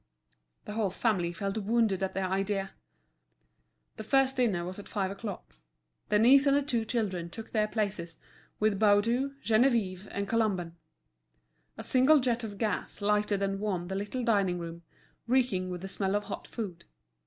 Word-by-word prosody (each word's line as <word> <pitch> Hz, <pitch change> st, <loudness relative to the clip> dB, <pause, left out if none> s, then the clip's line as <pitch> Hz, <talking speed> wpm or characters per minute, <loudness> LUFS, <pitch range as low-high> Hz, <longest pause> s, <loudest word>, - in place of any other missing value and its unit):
The -, -, -6 dB
whole 215 Hz, -2 st, 0 dB
family 185 Hz, -3 st, 0 dB
felt 195 Hz, +4 st, -3 dB
wounded 220 Hz, -2 st, +1 dB
at 190 Hz, -, -2 dB
the 195 Hz, -, 0 dB
idea. 195 Hz, +1 st, -1 dB, 1.3 s
The 220 Hz, -, -5 dB
first 270 Hz, +3 st, +2 dB
dinner 205 Hz, -9 st, +1 dB
was 185 Hz, +2 st, -6 dB
at 205 Hz, -, -10 dB
five 195 Hz, -2 st, -1 dB
o'clock. 200 Hz, -, -7 dB, 0.6 s
Denise 250 Hz, +7 st, +6 dB
and 280 Hz, 0 st, +5 dB
the 285 Hz, -, +1 dB
two 240 Hz, -5 st, -1 dB
children 195 Hz, -8 st, -2 dB
took 220 Hz, +5 st, -9 dB
their 215 Hz, -1 st, +2 dB
places, 195 Hz, -7 st, -3 dB, 0.4 s
with 210 Hz, -2 st, +2 dB
Baudu, 230 Hz, +6 st, +3 dB
Geneviève, 215 Hz, -5 st, +2 dB
and 200 Hz, 0 st, -3 dB
Colomban. 195 Hz, -7 st, 0 dB, 1.0 s
A -, -, -6 dB
single 265 Hz, +4 st, +5 dB
jet 245 Hz, -2 st, 0 dB
of 205 Hz, -2 st, -6 dB
gas 215 Hz, -1 st, -2 dB
lighted 210 Hz, -1 st, +1 dB
and 195 Hz, 0 st, -1 dB
warmed 185 Hz, -4 st, -2 dB
the 190 Hz, -, -3 dB
little 205 Hz, +6 st, -3 dB
dining 200 Hz, -6 st, +2 dB
room, 170 Hz, 0 st, -7 dB, 0.5 s
reeking 235 Hz, -8 st, +1 dB
with 180 Hz, -1 st, -5 dB
the 195 Hz, -, -5 dB
smell 195 Hz, 0 st, -1 dB
of 205 Hz, -, 0 dB
hot 205 Hz, -, -7 dB
food. 185 Hz, -7 st, -6 dB
205 Hz, 165 wpm, -30 LUFS, 190-230 Hz, 1.3 s, Denise